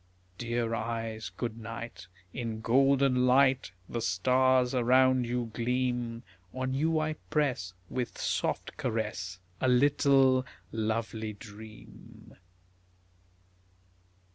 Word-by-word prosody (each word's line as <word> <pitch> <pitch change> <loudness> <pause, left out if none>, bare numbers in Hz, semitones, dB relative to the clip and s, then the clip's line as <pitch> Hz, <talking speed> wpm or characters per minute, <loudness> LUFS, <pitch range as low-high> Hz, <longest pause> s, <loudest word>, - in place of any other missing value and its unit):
Dear 120 -1 -1
eyes, 115 -1 -3
good 115 -2 -3
night, 115 -4 -7 0.3
In 115 -3 -4
golden 135 +1 +3
light 130 -3 +4 0.2
The 115 - -3
stars 125 +7 +3
around 130 0 +4
you 120 -1 -2
gleam; 120 -1 -1 0.3
On 130 0 -2
you 160 +4 +1
I 155 0 0 0.2
press 125 - 0
With 125 0 -4
soft - - -2
caress 100 -5 -3 0.2
A 130 - +2
little 135 0 +4 0.3
lovely 110 0 -2
dream. 105 +1 -13
120 Hz, 95 wpm, -30 LUFS, 110-130 Hz, 0.3 s, light